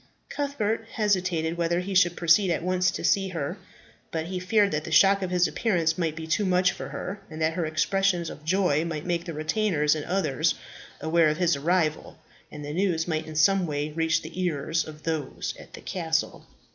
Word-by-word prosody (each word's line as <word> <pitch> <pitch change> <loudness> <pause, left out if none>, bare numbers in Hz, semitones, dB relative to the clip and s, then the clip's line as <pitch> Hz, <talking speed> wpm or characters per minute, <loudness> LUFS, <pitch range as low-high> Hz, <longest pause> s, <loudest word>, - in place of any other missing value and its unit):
Cuthbert 225 -6 -2
hesitated 185 -6 0
whether 170 0 +1
he 190 +2 -4
should 175 -2 +4
proceed 175 +3 +4
at 165 -1 0
once 185 0 +2
to - - -5
see 195 -1 +2
her; 170 +1 -4 0.5
but 160 -1 -3
he 180 +1 -4
feared 200 +2 +2
that 150 0 -1
the 160 - -7
shock 195 +5 +5
of 185 - -2
his 180 0 +3
appearance 170 -8 +1
might 165 -3 -1
be 160 0 -6
too 160 +6 +1
much 185 -1 +3
for - - -7
her, 200 +3 -6
and 155 -1 -8
that 160 0 +1
her 170 -2 -1
expressions 180 +2 +1
of 150 - -9
joy 165 -3 +2
might 155 -3 -4
make 170 -1 -1
the 170 - -5
retainers 155 -1 +1
and 155 -1 -3
others 180 -8 +1 0.5
aware 160 +1 +3
of 155 - -1
his 175 -2 +2
arrival, 155 +1 0 0.3
and 150 -1 -8
the 145 - -5
news 175 -2 0
might 160 -1 -2
in 155 - -8
some 180 +4 +3
way 145 0 -2
reach 160 +1 0
the 165 +4 -6
ears 160 -1 -1
of 155 -1 -11
those 155 -4 -3
at - - -14
the - - -10
castle. 165 -3 -2
170 Hz, 205 wpm, -26 LUFS, 155-185 Hz, 0.5 s, shock